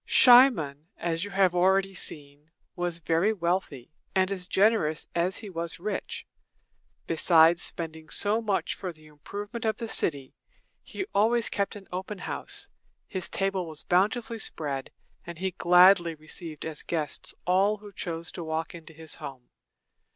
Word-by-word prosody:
Cimon, 220 - +6
as 165 0 -2
you 205 - -5
have 190 -2 +3
already 190 +2 +2
seen, 145 -3 -2 0.3
was 175 -1 -1
very 170 +5 +1
wealthy, 170 - -2 0.2
and 190 0 +2
as 185 -2 -4
generous 190 -7 +2
as 175 +2 0
he 215 - -7
was 170 -1 -4
rich. 210 +5 -4 0.8
Besides 165 +1 +5
spending 160 -1 -4
so 210 +2 +2
much 205 -4 -1
for 185 -2 -5
the 155 -2 -19
improvement 205 +9 -8
of 220 -1 0
the 230 - -5
city, 140 -10 0 0.5
he 390 - -6
always 230 +3 +3
kept 200 0 -2
an 200 -2 -11
open 190 +3 -5
house. - - -3 0.4
His 185 -2 -4
table 195 -2 -1
was 155 -2 -2
bountifully 220 +5 +1
spread, 140 -9 -2 0.4
and 170 -1 -7
he 190 +2 -2
gladly 180 -1 +5
received 155 0 -7
as 160 -2 -2
guests 155 -4 -3
all 195 +4 +3
who 205 0 -12
chose 165 -2 -4
to 175 - -6
walk 160 0 -3
into 165 -1 -11
his 160 0 -6
home. 130 -3 -9
175 Hz, 150 wpm, -27 LUFS, 160-200 Hz, 0.8 s, Cimon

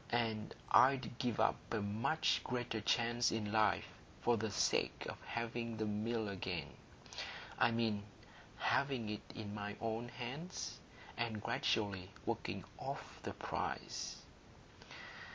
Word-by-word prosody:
And 110 -2 0 0.2
I'd 130 -2 +6
give 120 -4 0
up - - +4
a 115 - +1
much 110 +10 +2
greater 120 -3 -1
chance 120 +2 +3
in 105 -2 -1
life 110 -3 +4 0.4
for 120 - +5
the 110 0 0
sake 105 - +2
of - - -4
having 115 0 -2
the 110 - +1
Mill 110 +1 0
again,—I 100 +4 -2
mean 115 -3 +1 0.6
having 135 -6 +2
it 105 -1 -2
in 105 -2 -4
my 105 0 -3
own 115 +1 -1
hands, 130 +10 -4 0.4
and 115 -2 0
gradually 95 -4 +1 0.2
working - - -1 0.2
off - - -5
the - - -3
price." - - -3
115 Hz, 120 wpm, -38 LUFS, 105-120 Hz, 0.6 s, I'd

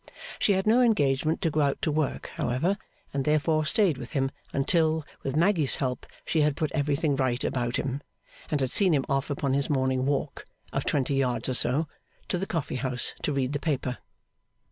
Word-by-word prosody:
She 205 - +3
had 190 0 0
no 230 +4 +5
engagement 155 - +2
to 165 - +2
go 155 - +1
out 140 -1 +1
to 155 - +2
work, 150 -2 -2
however, 160 +12 0 0.3
and 140 -1 0
therefore 155 +1 +2
stayed 195 - +3
with - - -8
him 135 -2 0 0.2
until, 160 +2 +1 0.2
with 135 0 -3
Maggy's 165 -3 +3
help, 130 -2 -3 0.2
she 160 - +1
had 150 -1 +2
put 155 0 -1
everything 145 0 +1
right 130 -2 0
about 120 -1 -1
him, 135 +1 -2 0.5
and 150 -2 0
had 130 -1 0
seen 185 -6 +4
him 135 - 0
off 135 +2 0
upon 140 -1 -1
his 140 0 +1
morning 130 -2 +1
walk 140 -1 -1 0.3
(of - - -1
twenty 140 0 +1
yards 125 -3 0
or - - 0
so) 130 +6 +2 0.4
to 180 - 0
the 195 - -3
coffee 160 -7 -2
house 130 -1 -2
to - - 0
read 135 -1 -1
the 145 - -1
paper. 135 -5 -2
140 Hz, 195 wpm, -27 LUFS, 130-160 Hz, 0.5 s, no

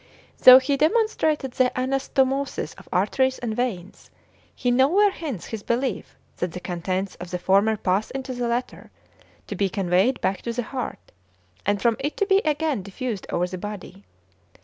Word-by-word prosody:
Though 255 0 +11
he 275 +2 +1
demonstrated 315 - +1
the 250 0 +2
anastomosis 270 - -1
of - - -16
arteries 260 +8 +1
and 225 -3 -4
veins, 205 -7 -4 0.5
he 245 - 0
nowhere 330 +12 +4
hints 290 - -6
his 220 -2 -6
belief 245 +5 -2 0.2
that 175 -2 -3
the 180 - -5
contents 185 +2 -3
of 175 - -8
the 180 - -3
former 200 +4 +2
pass 195 +2 0
into 265 -1 -5
the 245 -1 -2
latter, 240 +2 -3 0.6
to 205 - -6
be 195 +1 0
conveyed 190 +7 +1
back 190 -1 -1
to 235 - -4
the 245 +1 -2
heart, 255 +3 -6 0.6
and 205 0 +2
from 230 -2 +3
it 290 +2 -3
to 405 - +2
be 390 -1 +4
again 305 - 0
diffused 200 +2 -5
over 175 - 0
the 180 0 -6
body. 200 -1 -8
240 Hz, 170 wpm, -24 LUFS, 195-270 Hz, 0.6 s, Though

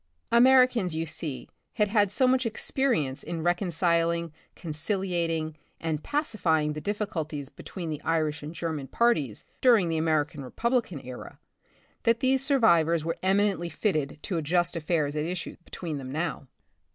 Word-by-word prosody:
Americans, 245 -6 +5
you 165 +1 -1
see, 155 -3 -5 0.3
had 210 -3 +1
had 205 -2 +3
so 255 +4 +3
much 255 0 +3
experience 225 - 0
in 165 -2 -4
recon 175 +2 +1
ciling, 170 0 +1 0.2
conciliating 165 -1 -2 0.2
and 160 -2 -2
pacifying 180 - 0
the 150 - -6
difficulties 160 -9 -3
between 170 0 -7
the 150 -1 -5
Irish 155 -2 0
and 150 +3 -7
German 160 -5 -3
parties 155 - +1 0.2
during 225 -9 +5
the 165 - 0
American 155 -2 0
Republican 235 - -1
era, 125 -1 -9 0.6
that 230 0 +3
these 265 0 +2
survivors 170 - +3
were 165 - -2
eminently 190 -2 +2
fitted 155 -8 -1
to 180 - -2
adjust 175 +3 +1
affairs 155 -3 0
at 150 - 0
issue 175 +2 -4
between 160 -5 -5
them 130 -1 -7
now. 155 -2 -3
170 Hz, 145 wpm, -27 LUFS, 155-210 Hz, 0.6 s, Americans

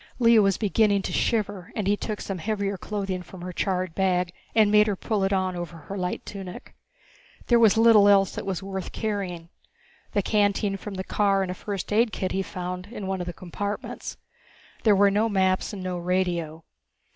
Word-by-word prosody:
Lea 230 -2 +6
was 195 -2 +3
beginning 205 -1 +2
to - - -4
shiver, 205 -5 -1
and 210 - -2
he 205 +1 +3
took 210 0 -4
some 195 -2 -4
heavier 200 +1 -1
clothing 195 -1 -3
from 180 0 -12
her 180 0 -5
charred 185 -2 -1
bag 180 -2 +1 0.2
and 215 -2 +5
made 210 0 +6
her 205 - 0
pull 210 +1 -1
it 195 - +1
on 185 -1 0
over 175 -1 -6
her 165 +5 -8
light 180 -2 -3
tunic. 190 -3 -8 0.7
There 240 -1 +4
was 220 -2 +5
little 225 -3 +7
else 195 -2 +4
that - - -5
was 190 -1 -2
worth 190 -1 -5
carrying 190 -6 -3 0.6
the 205 - +1
canteen 205 -1 +1
from 195 +1 -7
the 190 - -3
car 195 -1 +2
and 185 - -3
a - - -2
first 200 +1 -5
aid 225 +1 +3
kit 185 -4 -3
he 195 - 0
found 180 -1 -5
in 210 -3 -7
one 190 -1 -2
of 175 - -5
the - - -2
compartments. 200 +4 -5 0.6
There 215 -3 +5
were 200 0 +5
no 215 +3 +2
maps 190 -2 +1
and 195 -3 -7
no 180 -1 -3
radio. 175 -3 -1
195 Hz, 200 wpm, -25 LUFS, 185-210 Hz, 0.7 s, little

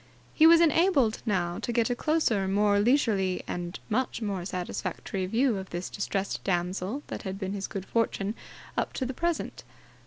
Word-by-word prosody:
He 320 - +7
was 335 0 +8
enabled 320 - +3
now 180 -3 0
to 235 - -3
get 235 +1 +1
a - - +1
closer, 245 -10 +1
more 205 +1 +3
leisurely 205 -6 +2
and 175 +1 -4
much 245 +3 -1
more 200 -5 -2
satisfactory 185 +1 -3
view 230 +2 +2
of 190 - -8
this 175 +1 -5
distressed 200 -1 -2
damsel 185 +8 -1
than - - -5
had 190 -2 -5
been 195 -1 -3
his 195 -1 -3
good 195 -3 -5
fortune 215 -3 0 0.4
up - - -1
to 260 - -2
the 260 - -3
present. 340 +4 -2
205 Hz, 175 wpm, -28 LUFS, 190-250 Hz, 0.4 s, was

